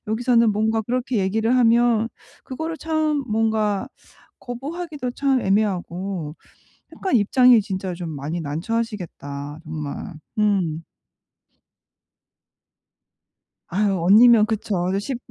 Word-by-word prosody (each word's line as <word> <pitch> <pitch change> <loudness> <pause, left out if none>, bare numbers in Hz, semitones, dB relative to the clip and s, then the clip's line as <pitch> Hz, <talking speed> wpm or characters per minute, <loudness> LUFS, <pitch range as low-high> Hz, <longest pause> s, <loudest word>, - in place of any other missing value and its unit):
여기서는 230 0 +2
뭔가 220 +2 +1
그렇게 245 +1 -2
얘기를 220 +5 +1
하면 235 -2 +3 0.4
그거를 320 +4 -5
참 310 -2 0
뭔가 220 0 0 0.5
거부하기도 285 +2 -5
참 270 0 +1
애매하고 190 -5 -1 0.6
약간 380 -8 0
입장이 245 +2 +5
진짜 190 -3 -4
좀 170 -1 -6
많이 150 +3 -4
난처하시겠다, 160 -4 -4
정말. 155 +3 -6 0.2
음. 185 -7 +1 2.8
아유, 195 0 0
언니면 215 +5 +7
그쵸. 200 -5 -2
더 195 - 0
쉽 250 +5 -4
215 Hz, 225 characters per minute, -22 LUFS, 185-245 Hz, 2.8 s, 언니면